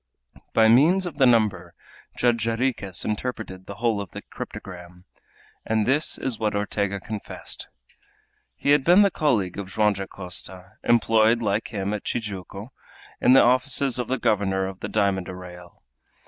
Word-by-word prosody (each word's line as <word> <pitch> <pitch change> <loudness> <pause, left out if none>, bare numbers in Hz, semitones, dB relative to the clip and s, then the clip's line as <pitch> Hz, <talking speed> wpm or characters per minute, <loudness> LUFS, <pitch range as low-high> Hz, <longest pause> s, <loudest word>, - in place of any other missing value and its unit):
By 110 -1 +5
means 160 +12 +5
of 165 -5 -6
the 135 -3 +5
number 100 -7 +1 0.4
Judge 120 -2 +2
Jarriquez 115 -4 -2
interpreted 105 -4 -4
the 100 - -7
whole 115 -2 0
of 100 - -8
the - - -8
cryptogram. 90 -1 -9 0.6
And 110 -1 0
this 145 +4 +2
was 125 -5 -2
what 105 -2 -1
Ortega 100 -1 -1
confessed. 105 +2 -7 0.9
He 145 - 0
had 145 -1 +4
been 180 +6 +6
the 200 - +3
colleague 110 - 0
of 95 -2 -6
Joam 105 +1 +2
Dacosta, 95 0 -7
employed, 115 0 +3
like 105 -1 -1
him, 100 -1 -3
at 105 - -4
Tijuco, 105 0 -5 0.5
in 125 - +5
the 135 - +7
offices 130 +1 +2
of 125 - -2
the 130 - -1
governor 100 -5 0
of 95 0 -7
the - - -5
diamond 100 -3 0
arrayal. 90 -1 -11
105 Hz, 155 wpm, -24 LUFS, 95-120 Hz, 0.9 s, the